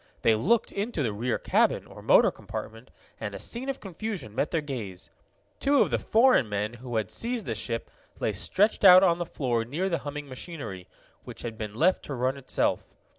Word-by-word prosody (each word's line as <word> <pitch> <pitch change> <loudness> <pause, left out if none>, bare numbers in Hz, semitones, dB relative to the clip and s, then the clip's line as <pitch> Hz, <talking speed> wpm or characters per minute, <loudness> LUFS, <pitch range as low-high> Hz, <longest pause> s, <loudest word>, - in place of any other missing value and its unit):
They 115 - +5
looked 210 - +2
into 200 -6 -2
the 110 -4 -1
rear 115 +4 -1
cabin, - - +1
or - - -13
motor - - +5
compartment, 115 +3 -8 0.3
and 105 -2 -5
a - - -6
scene 245 - -3
of 270 - -3
confusion 195 - -6
met 135 +6 0
their 165 - 0
gaze. 115 -11 -7 0.5
Two 280 0 +4
of - - -4
the - - +1
foreign 230 - +4
men 105 +2 -2
who 125 -2 -6
had 110 -4 -1
seized 235 -3 -1
the 115 - -2
ship 115 +1 -4 0.3
lay - - 0
stretched 210 +3 +1
out 185 -1 +10
on 175 -2 +3
the 175 - -3
floor 120 -5 -1
near 155 +11 -2
the 170 - 0
humming 145 0 -6
machinery, 130 - -7 0.4
which - - -10
had 115 -2 -5
been 105 -1 -6
left 175 +9 +3
to 140 - -5
run 130 +2 0
itself. 135 -2 -1
140 Hz, 200 wpm, -27 LUFS, 115-190 Hz, 0.5 s, out